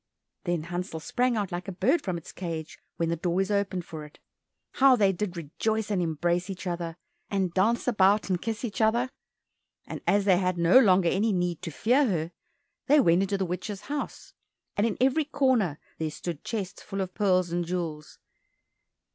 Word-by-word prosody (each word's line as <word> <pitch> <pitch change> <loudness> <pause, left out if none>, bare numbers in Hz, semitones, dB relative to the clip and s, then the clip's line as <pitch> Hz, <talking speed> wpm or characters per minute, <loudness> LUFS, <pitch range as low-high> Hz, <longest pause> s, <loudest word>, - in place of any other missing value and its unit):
Then 175 -3 0
Hansel 175 0 -4
sprang 245 +8 0
out 205 -3 -2
like 175 +1 -4
a - - -3
bird 230 - +2
from 185 -3 -2
its 165 - -10
cage 165 -3 -6 0.2
when 165 -1 0
the 170 - +1
door 175 +2 -1
is 195 +1 0
opened 200 -3 0
for 155 -2 -7
it. 150 - -13 0.5
How 265 -1 +6
they 200 -5 +4
did 185 -1 -4
rejoice 215 +8 -2
and 190 -3 +1
embrace 175 +3 0
each 190 -1 -6
other, 170 -2 -3 0.3
and 190 -3 0
dance 225 +7 +2
about 205 -2 +3
and 180 -2 -1
kiss 225 +1 -3
each 220 -1 -4
other! 235 +4 +2 0.7
And - - -7
as 200 0 +3
they 190 -3 +5
had 180 -1 0
no 170 +8 +6
longer 185 -7 +5
any 210 +5 +1
need 180 -3 -1
to - - -4
fear 250 - +2
her, 165 -5 -1 0.6
they 295 +2 +6
went 175 -7 +4
into 195 +1 0
the 190 - -1
witch's 190 +3 -4
house, 290 +1 -5 0.4
and 205 +3 +2
in 220 - -3
every 270 +4 +3
corner 250 - +1 0.2
there 160 -1 -1
stood 165 0 -6
chests 195 -5 -4
full 195 -1 -4
of 185 -1 -4
pearls 185 -4 +2
and 175 0 0
jewels. 165 -3 -4
185 Hz, 190 wpm, -27 LUFS, 175-215 Hz, 0.7 s, How